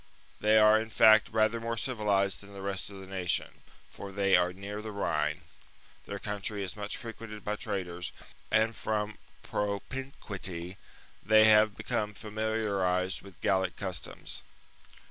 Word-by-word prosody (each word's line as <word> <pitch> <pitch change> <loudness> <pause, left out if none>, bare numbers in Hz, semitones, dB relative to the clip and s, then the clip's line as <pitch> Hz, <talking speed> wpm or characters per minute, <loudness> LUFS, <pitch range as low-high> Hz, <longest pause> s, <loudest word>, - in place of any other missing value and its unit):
They 110 +1 +5
are 110 0 +7
in 110 - -6
fact 110 0 +6
rather 110 +1 +2
more 115 0 -3
civilized 105 -6 0
than 100 0 -13
the 100 -1 -8
rest 100 -1 -2
of 100 -1 -9
the 95 - -9
nation; 95 -2 -2 0.3
for 100 - -9
they 100 0 +3
are 90 0 +3
near 100 +3 -6
the 110 0 -6
Rhine, 75 -7 -1 0.6
their 100 - -4
country 105 0 -3
is 95 - -5
much 105 0 -4
frequented 110 -3 -8
by 105 - -1
traders, 90 -5 -4 0.4
and, 110 +1 +3
from 105 -1 -2 0.2
propinquity, 100 -5 -4 0.5
they 110 +1 +6
have 110 -1 +6
become 105 -1 -2
familiarized 100 -4 0
with 95 -3 -14
Gallic 95 -2 +1
customs. 95 -4 -4
105 Hz, 145 wpm, -30 LUFS, 95-110 Hz, 0.6 s, are